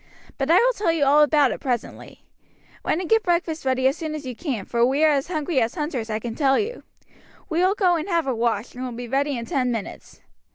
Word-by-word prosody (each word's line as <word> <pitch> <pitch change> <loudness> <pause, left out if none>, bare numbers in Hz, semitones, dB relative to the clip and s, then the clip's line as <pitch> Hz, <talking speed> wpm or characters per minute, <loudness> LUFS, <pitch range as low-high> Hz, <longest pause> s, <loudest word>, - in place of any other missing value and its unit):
But 270 +2 -1
I 335 - +6
will - - +4
tell 405 -7 0
you 320 -3 +1
all 290 +2 +5
about 295 -3 +4
it - - -4
presently; 245 -4 -5 0.6
run 320 - 0
and 365 - -4
get 445 +3 +4
breakfast 340 -5 -1
ready 260 0 +1
as 270 - +1
soon 310 -2 -4
as 300 -2 -7
you 250 -2 -5
can, 240 - -4
for 235 -1 0
we 270 +5 +2
are 310 - +6
as 275 -2 0
hungry 310 -4 -1
as 225 0 -1
hunters, 295 -8 -3
I 215 - -1
can 230 +1 -5
tell 270 +1 +2
you. 455 +4 -3 0.7
We 325 -1 0
will 375 +3 +3
go 365 -4 +2
and 325 +5 -5
have 335 -2 +1
a 265 - 0
wash, 230 -1 -1
and 250 - -7
will 250 -1 -5
be 240 +1 -7
ready 275 +2 0
in 235 - -5
ten 260 -5 0
minutes." 225 -4 -7
285 Hz, 250 wpm, -23 LUFS, 250-330 Hz, 0.7 s, I